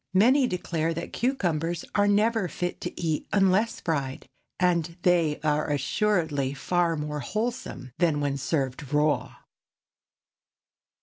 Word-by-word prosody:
Many 255 +7 +5
declare 165 -4 -2
that 170 - -6
cucumbers 175 - -1
are 205 -1 +3
never 210 0 +2
fit 175 +3 -4
to - - -5
eat 160 -3 -1
unless 200 +3 +2
fried, 140 -5 -2 0.3
and 170 -2 +1
they 170 -4 +3
are 150 0 +1
assuredly 145 -2 0
far 175 +3 +1
more 150 -1 -3
wholesome 215 - -4
than 165 -4 +2
when 140 -1 -1
served 135 -1 -2
raw. 150 0 +1
165 Hz, 120 wpm, -27 LUFS, 150-195 Hz, 0.3 s, Many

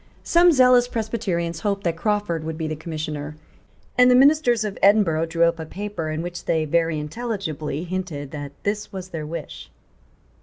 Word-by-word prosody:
Some 345 +1 +5
zealous 250 -3 +5
Presbyterians 200 -8 -2
hoped 200 0 -2
that 170 -2 0
Crawford 205 -3 -1
would 160 0 -5
be 160 -1 -3
the 155 - -3
Commissioner; 155 -2 -5 0.6
and 250 0 +7
the 250 - +6
ministers 260 -4 +4
of 205 -2 -4
Edinburgh 190 -6 +4
drew 165 +1 +1
up 170 0 +2
a 160 - -5
paper 195 -4 -5
in 155 +1 -3
which 175 0 -6
they 160 -1 +1
very 165 +1 +1
intelligibly 155 - -4
hinted 175 -6 -5
that 145 -2 -6
this 205 +1 -2
was 185 -1 -7
their 155 -4 -5
wish. 165 +2 -7
170 Hz, 175 wpm, -23 LUFS, 160-210 Hz, 0.6 s, and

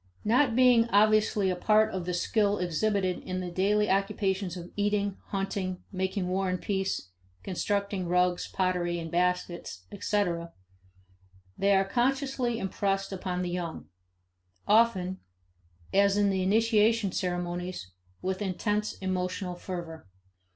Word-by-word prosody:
Not 240 +2 +3
being 245 -2 +5
obviously 210 -2 +3
a - - -1
part 215 +4 +3
of 185 -2 -3
the 180 - -1
skill 205 +2 +1
exhibited 185 +2 0
in 185 0 -4
the 180 -1 -4
daily 205 +4 +2
occupations 195 -2 0
of 175 0 -9
eating, 205 -1 0
hunting, 195 -2 -3
making 190 0 -2
war 190 +1 0
and 180 0 -1
peace, 190 - -2 0.3
constructing 200 0 -2
rugs, 180 0 +1
pottery, 180 -2 0
and 165 -1 -6
baskets, 175 - -1
etc., 170 -5 -1 1.0
they 200 0 +3
are 195 0 +3
consciously 255 +1 0
impressed 195 -1 -1
upon 180 -1 -3
the 175 - -3
young; 175 -2 -5 0.8
often, 200 -4 +3 0.7
as 200 0 +4
in 205 -1 +3
the 190 -1 0
initiation 220 +1 +3
ceremonies, 175 - -3 0.3
with 190 +2 -2
intense 205 +2 -1
emotional 185 -1 -3
fervor. 175 - -7
190 Hz, 125 wpm, -28 LUFS, 180-210 Hz, 1.0 s, being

